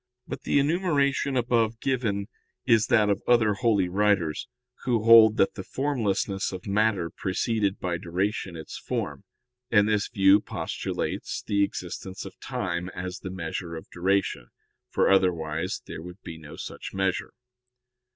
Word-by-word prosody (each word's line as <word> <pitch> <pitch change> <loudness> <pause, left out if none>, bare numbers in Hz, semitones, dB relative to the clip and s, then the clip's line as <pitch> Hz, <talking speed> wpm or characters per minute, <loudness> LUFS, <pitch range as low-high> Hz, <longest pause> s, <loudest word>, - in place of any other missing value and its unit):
But - - -5
the - - +1
enumeration 140 -3 +1
above 115 -2 +1
given 115 -7 -1 0.4
is 115 -2 +4
that 105 -2 +4
of 100 - -1
other 115 -3 +4
holy 105 -4 +2
writers, 95 -4 +1 0.4
who 120 -4 +1
hold 110 -1 +8
that 95 - +3
the - - -6
formlessness 105 -7 -1
of 95 -1 -7
matter 100 -4 +1
preceded 100 +1 -1
by 90 -1 -2
duration 95 +1 -2
its 80 -1 -8
form, - - -4 0.4
and 105 -1 +4
this 105 -1 +1
view 95 0 +5
postulates - - -4
the 100 0 +2
existence 95 0 -5
of - - -11
time 90 0 -3
as 90 +1 -5
the 95 - -6
measure 85 -1 -5
of 80 - -10
duration: 95 -8 0 0.4
for - - +2
otherwise 90 -2 +1
there - - -7
would 90 +3 -11
be 80 -1 -8
no 75 -2 -11
such - - -7
measure. 95 -1 -1
100 Hz, 145 wpm, -26 LUFS, 90-110 Hz, 0.4 s, hold